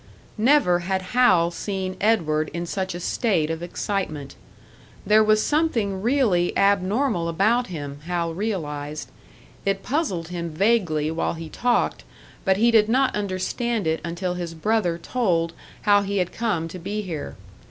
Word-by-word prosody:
Never 230 -7 +4
had 190 +2 -2
Hal 185 -9 +4
seen 190 +1 -4
Edward 155 -8 +2
in 170 0 -2
such 190 +1 -3
a - - -5
state 175 -5 0
of 165 0 -4
excitement. 175 -5 -3 0.7
There 215 +2 +5
was 215 0 +3
something 230 -12 0
really 220 -8 +2
abnormal 200 0 +2
about 220 +9 +2
him, 145 -5 -6
Hal 170 -2 -1
realised; 155 -7 -4 0.5
it 195 0 -1
puzzled 220 - -1
him 170 -1 -4
vaguely 160 -4 +1
while 165 +1 -1
he 165 -1 -7
talked, 245 +8 0 0.4
but 190 -1 +3
he 235 +3 +4
did 220 -1 +4
not 260 +3 +2
understand 210 +3 -2
it 160 0 0
until 175 +2 -3
his 175 -2 -5
brother 195 -1 +1
told 170 -5 0 0.3
how 205 -1 +5
he 200 0 -2
had 180 -2 0
come 205 -8 -1
to 185 - -8
be 210 +5 -3
here. 165 -6 -5
190 Hz, 150 wpm, -24 LUFS, 170-215 Hz, 0.7 s, There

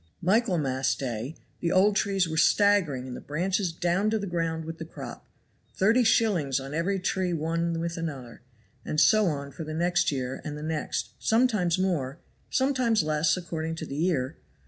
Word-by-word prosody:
"Michaelmas 170 - +1
day 125 +3 -4 0.2
the 170 - -1
old 200 +2 +4
trees 195 -3 +1
were 160 - -4
staggering 165 -5 +3
and 125 - -6
the - - -8
branches 180 +4 -1
down 175 +5 +1
to 220 - +1
the 200 - -3
ground 165 -3 -2
with 165 0 -7
the - - -4
crop; 160 - -9 0.5
thirty 225 +6 +4
shillings 185 - +2
on 135 +1 -7
every 175 +5 0
tree 185 -1 -1
one 165 +1 -1
with 170 0 -3
another; 140 -8 -6 0.4
and 150 - -1
so 215 +2 +5
on 140 -3 -3
for 160 - -7
the 155 0 -5
next 175 0 +2
year, 130 -1 -3
and 150 -1 -5
the 150 - -7
next; 155 -1 -2
sometimes 220 -7 +2
more, 165 -8 -1 0.3
sometimes 255 - +2
less, 155 +1 +2
according 165 -2 -4
to 160 - -5
the 140 - -6
year. 155 -4 0
165 Hz, 175 wpm, -27 LUFS, 150-190 Hz, 0.5 s, so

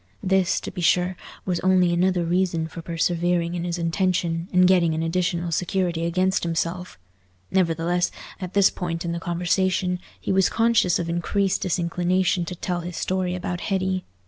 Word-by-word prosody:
This, 190 -1 +2
to - - -6
be 180 - -6
sure, 180 +2 +2 0.3
was 180 -2 0
only 185 -2 +3
another 180 0 +2
reason 175 -2 0
for 165 +1 -8
persevering 170 +1 0
in 175 -1 -3
his 175 0 -2
intention, 170 -1 0
and 180 0 +5
getting 175 -4 +3
an 160 - -1
additional 175 0 -1
security 175 -1 0
against 185 +2 +1
himself. 170 +2 -2 0.5
Nevertheless, 175 -1 +1 0.3
at 185 -1 -6
this 200 -1 +5
point 175 -1 -4
in 170 - -1
the 170 - -3
conversation, 180 +1 0 0.2
he - - -3
was 190 0 +3
conscious 225 -6 +3
of 170 - -3
increased 185 +3 0
disinclination 180 0 0
to 180 - -6
tell 180 0 -3
his 175 0 -6
story 185 -1 -1
about 180 -1 -4
Hetty. 190 -2 -1
180 Hz, 165 wpm, -24 LUFS, 170-185 Hz, 0.5 s, and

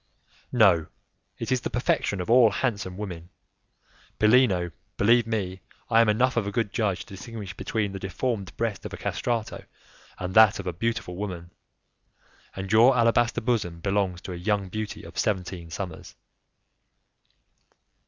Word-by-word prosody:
"No, 95 -10 +4 0.5
it - - -4
is 130 -1 +2
the - - -3
perfection 105 -4 0
of 90 - -5
all 120 -1 +6
handsome 100 -4 -2
women. 90 -5 -6 0.9
Bellino, 105 -6 +4 0.3
believe 115 +2 +4
me, 95 -5 -3 0.3
I 115 - +6
am 115 - +3
enough 125 +5 +2
of 110 -4 0
a - - -2
good 105 -2 -1
judge 100 -5 0
to - - -11
distinguish 105 -1 -7
between 105 -3 -2
the 95 - -6
deformed 100 +1 -3
breast 110 -4 -2
of - - -7
a - - -5
castrato, 115 -2 -3 0.5
and 90 0 -4
that 110 -1 +7
of 100 - -6
a 90 - -2
beautiful 115 -1 -2
woman; 90 -4 -5 1.0
and 95 0 -5
your 120 +4 +6
alabaster 120 0 +3
bosom 105 -8 -1
belongs 95 -1 -1
to 90 - -6
a - - -6
young 100 +1 -1
beauty 110 +1 -5
of - - -7
seventeen 90 -4 -2
summers." 90 0 -7
105 Hz, 155 wpm, -26 LUFS, 95-115 Hz, 1.0 s, that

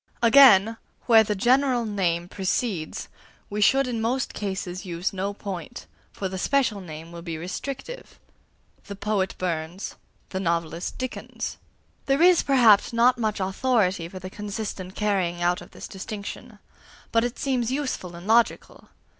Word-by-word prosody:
Again, 230 -4 +7 0.3
where 225 -2 +7
the 210 -1 -2
general 245 +3 +3
name 175 -5 -1
precedes, 190 -2 -2 0.4
we 210 +1 -2
should 270 +6 +4
in 240 -3 -3
most 245 +3 -1
cases 190 -2 -4
use 175 +2 -3
no 195 +1 -2
point, 200 +3 -7 0.3
for 195 - -4
the 190 0 -5
special 240 -4 +1
name 165 -1 -9
will 170 0 -8
be 165 -2 -5
restrictive: 270 - -6 0.7
"the 200 - -7
poet 200 -2 -1
Burns," 170 +1 -4 0.3
"the 190 - -3
novelist 170 -1 -2
Dickens." 255 -1 -5 0.5
There 275 +4 +3
is, 360 -1 +6
perhaps, 240 -8 +5
not 240 +1 +3
much 215 -2 -1
authority 190 -3 +1
for 185 - -9
the 185 0 -8
consistent 200 -2 -5
carrying 190 -5 0
out 175 +1 +1
of - - -12
this - - -9
distinction; 210 +3 -7 0.5
but 230 0 +3
it 240 +1 -3
seems 255 -3 0
useful 260 -11 -3
and 170 +1 -10
logical. 230 +2 +1
205 Hz, 145 wpm, -25 LUFS, 185-240 Hz, 0.7 s, Again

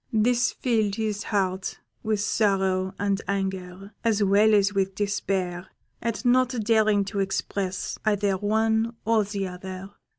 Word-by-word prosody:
This 240 +2 +2
filled 220 -5 0
his 215 -2 -2
heart 190 -2 -1 0.2
with 215 -1 0
sorrow 190 -3 +1
and 200 -1 0
anger, 195 0 -4
as 220 -3 +2
well 205 +2 +5
as 205 0 +3
with 195 -1 0
despair, 190 -3 -2 0.3
at 230 +2 -3
not 255 +1 +4
daring 215 -2 +3
to 200 +1 -4
express 190 -1 -2
either 205 -2 +1
one 220 +3 +1
or 225 -1 +3
the 200 -1 -3
other. 185 +1 -8
200 Hz, 135 wpm, -25 LUFS, 190-220 Hz, 0.3 s, well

